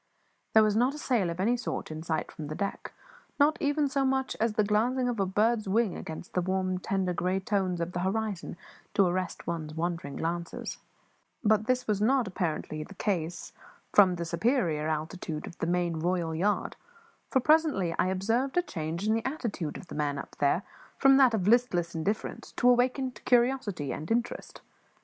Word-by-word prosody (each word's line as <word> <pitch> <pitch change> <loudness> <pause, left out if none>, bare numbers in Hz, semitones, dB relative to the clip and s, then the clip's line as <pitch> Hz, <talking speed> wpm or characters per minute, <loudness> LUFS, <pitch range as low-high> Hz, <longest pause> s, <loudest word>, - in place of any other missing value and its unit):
There 220 - +8
was 210 -1 +2
not 250 +5 +2
a - - -6
sail 235 - +1
of 170 +1 -5
any 225 +6 +2
sort 240 - -4
in 155 0 -5
sight 160 -1 -2
from 150 - -7
the 155 - -5
deck, 200 +2 -4 0.5
not 295 +2 +5
even 290 0 +2
so 275 0 0
much 265 0 0
as 225 0 +1
the 215 - +2
glancing 240 +5 +1
of 240 -3 -2
a 195 - +1
bird's 215 +3 +1
wing 215 -1 +2
against 160 +2 -8
the 180 - +1
warm, 185 0 -1
tender, 185 -1 -1
grey 185 +2 0
tones 190 -3 -1
of 170 +1 -2
the 175 - -3
horizon 195 -2 -2 0.4
to 195 - +5
arrest 180 0 -2
one's 160 -2 -4
wandering 165 -4 -3
glances; 170 +1 -4 0.6
but 215 0 +3
this 255 0 +1
was 210 -2 0
apparently 190 - 0
not 155 - -6
the 200 - -12
case 175 -4 -2 0.4
from 190 -3 +6
the 170 -1 -4
superior 170 - +1
altitude 155 0 -3
of - - -11
the 165 - -1
main 175 -2 0
royal 170 -1 0
yard, 195 +6 0 0.5
for 265 - +3
presently 290 - +3
I - - +3
observed 225 - 0
a 355 - +4
change 170 - -4
in 220 - +3
the 225 0 0
attitude 230 - -3
of - - -10
the - - -10
man 145 -1 -1
up - - -8
there 145 +6 +2 0.3
from 270 -1 +6
that 260 -4 +5
of 190 -3 -1
listless 210 -8 +3
indifference 195 +7 -3
to 245 - +1
awakened 250 0 +2
curiosity 240 - +2
and 155 - -6
interest. 235 +1 -2
195 Hz, 185 wpm, -29 LUFS, 170-240 Hz, 0.6 s, There